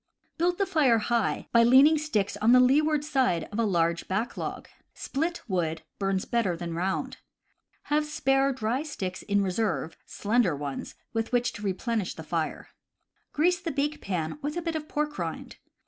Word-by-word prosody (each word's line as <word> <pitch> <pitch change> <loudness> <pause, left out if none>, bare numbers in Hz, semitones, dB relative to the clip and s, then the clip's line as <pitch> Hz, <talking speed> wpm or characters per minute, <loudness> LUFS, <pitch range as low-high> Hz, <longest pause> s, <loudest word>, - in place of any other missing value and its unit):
Build 350 +1 +2
the 395 - +2
fire 280 -10 +3
high, 230 0 0
by 235 - +6
leaning 270 +6 +6
sticks 215 -11 -1
on 220 +3 +4
the 255 - +8
leeward 295 +4 +3
side 260 - +1
of 210 - -4
a 230 - +3
large 170 -4 +1
back 215 +6 -2
log. - - -5 0.3
Split 330 +5 -3
wood 165 -5 -1 0.2
burns 195 -1 0
better 205 -8 0
than 170 0 -5
round. 185 +3 -2 0.7
Have 300 +1 0
spare 270 -2 +2
dry 245 +1 -1
sticks 190 -12 -5
in 205 0 +1
reserve 190 -3 -1
(slender 210 -6 +1
ones) 140 -1 -5 0.2
with 225 0 -2
which 245 0 +1
to - - -9
re 200 -2 0
plenish 220 -1 -2
the 160 - -8
fire. 160 0 -3 0.6
Grease 350 +4 +2
the 355 - -3
bake 295 +1 -1
pan 180 - -3
with 300 +3 -3
a - - -1
bit 330 -1 -2
of 305 -1 -4
pork 300 0 -2
rind. - - -5
235 Hz, 180 wpm, -27 LUFS, 190-295 Hz, 0.7 s, the